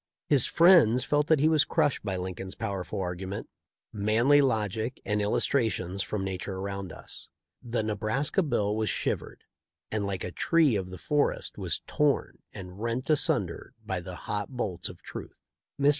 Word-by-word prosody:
His 140 -5 +4
friends 165 - +6
felt 145 +3 +1
that 160 -3 +4
he 150 - +4
was 155 -2 +5
crushed 145 - +1
by 95 -3 -2
Lincoln's 95 +1 -5
pow 110 -3 -3
erful 95 +1 -4
argument, 95 +2 -5 0.5
manly 115 +7 +4
logic, 110 -1 -1
and 105 0 0
illustrations 105 -3 0
from 100 0 -3
nature 95 0 -4
around 100 -1 -5
us. - - -10 0.3
The 115 -2 -2
Nebraska 110 - 0
bill 105 - 0
was 110 -2 0
shivered, - - -2 0.5
and 110 -1 -1
like 95 -3 -3
a 90 - -4
tree 160 - +3
of 95 -2 -2
the 95 - -8
forest 145 - 0
was - - 0
torn 150 -2 0
and 90 +1 -9
rent 115 +4 -2
asun 150 - +3
der - - -10
by - - -2
the - - -8
hot 105 -1 -2
bolts 110 -9 -3
of - - -13
truth. - - -9 0.4
Mr. 140 +1 +5
110 Hz, 170 wpm, -28 LUFS, 95-135 Hz, 0.5 s, friends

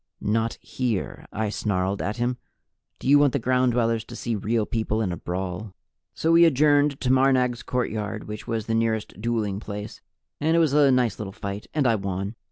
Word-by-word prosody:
"Not 115 +2 0
here!" 120 -7 -3
I 110 0 -2
snarled 100 -2 -1
at 105 +3 -2
him. 120 +1 -1 0.6
"Do - - -7
you 145 +1 +7
want 145 -3 +4
the - - +2
Ground 125 0 +2
Dwellers 115 -1 +1
to - - -10
see 120 -2 -2
Real 110 +2 0
People 110 -1 -1
in 105 -5 0
a - - -2
brawl?" 90 +3 -5 0.4
So 165 - +1
we 170 +1 +7
adjourned 145 -2 +4
to 125 - +1
Marnag's 130 -2 +3
courtyard, 110 -4 -3
which 105 0 -7
was 115 -2 -2
the 115 - -2
nearest 110 -2 -1
dueling 110 -4 -1
place, 105 -1 -7 0.4
and 160 +2 +2
it - - +5
was 160 -4 +3
a 145 -1 +5
nice 125 -3 +2
little 100 -2 -5
fight, 100 +1 -6
and 150 -3 +2
I 115 - +4
won. 100 0 -3
115 Hz, 195 wpm, -25 LUFS, 105-130 Hz, 0.6 s, you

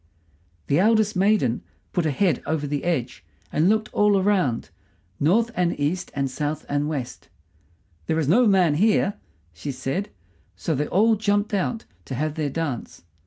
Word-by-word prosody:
The 145 - +2
eldest 220 +1 +3
maiden 185 - +2 0.3
put 175 - 0
her - - +2
head 160 +1 +1
over 155 -1 -1
the 145 +1 -3
edge 130 - -2 0.3
and 160 +5 +3
looked 215 0 0
all 210 -1 +4
around, 185 - +1 0.5
north 220 +11 +2
and 175 -4 0
east 165 +5 -1
and 140 -1 0
south 150 +3 -3
and 145 +1 -1
west. 135 -6 -5 0.8
"There 160 - +1
is 155 -4 0
no 230 +9 +5
man 185 -6 +4
here," 205 +4 +2 0.4
she 140 - -5
said. 135 +9 -3 0.5
So 160 - -2
they 150 +1 -1
all 220 +4 +3
jumped 205 0 0
out 205 +3 -1 0.2
to 130 - -5
have 155 +3 -1
their 155 -2 -2
dance. 140 - -4
165 Hz, 165 wpm, -24 LUFS, 145-205 Hz, 0.8 s, no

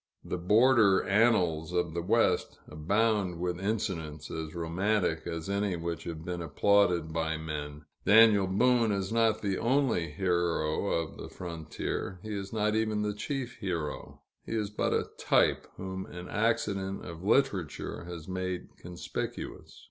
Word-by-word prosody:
The 90 - -4
border 105 +1 +5
annals 90 -7 +2
of 90 -2 0
the 85 - -2
West 85 - +2
abound 100 +3 0
with 90 0 -2
incidents 85 -8 -3
as 80 0 -5
romantic 85 +1 0
as 85 0 -4
any 100 -1 0
which 85 -1 -4
have 85 -2 -6
been 90 -1 -3
applauded 90 -2 +2
by 80 -1 -1
men. 75 -1 -6 0.2
Daniel 105 -2 +6
Boone 115 +4 +3
is 100 +1 -1
not 115 -2 +2
the 100 -2 0
only 125 - +1
hero 85 0 0
of 85 -4 -1
the - - -8
frontier; 85 +2 -5
he 110 -1 -5
is 100 -1 -5
not 105 -1 +1
even 110 -1 0
the 105 0 -1
chief 125 +3 -4
hero, 85 -8 -4 0.2
he - - -6
is 105 -2 -1
but 105 - 0
a - - +1
type, - - +2
whom 95 0 -5
an 90 +1 -8
accident 105 -3 -1
of 85 0 -8
literature 95 - 0
has 85 -2 -8
made 95 -1 -4
conspicuous. 90 0 -6
95 Hz, 150 wpm, -30 LUFS, 85-105 Hz, 0.2 s, Daniel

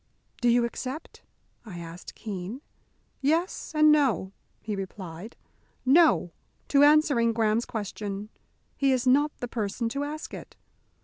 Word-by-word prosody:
"Do 240 - +3
you 235 0 +4
accept?" 260 +5 -6 0.4
I 205 -7 -9
asked 170 +1 -9
Keene. 205 +4 -6 0.6
"Yes 325 +7 0
and 305 0 +6
no!" 255 - +2 0.3
he 215 -2 -4
replied. 190 +1 -7 0.5
"No! 285 - +5 0.4
to 280 - +4
answering 290 -6 +4
Graham's 225 0 +1
question. 205 -1 -5 0.5
He 275 -1 +2
is 255 -1 +1
not 285 +4 +4
the 245 - -4
person 230 0 -2
to 280 +4 -2
ask 305 +2 -6
it. - - -9
235 Hz, 130 wpm, -27 LUFS, 205-285 Hz, 0.6 s, and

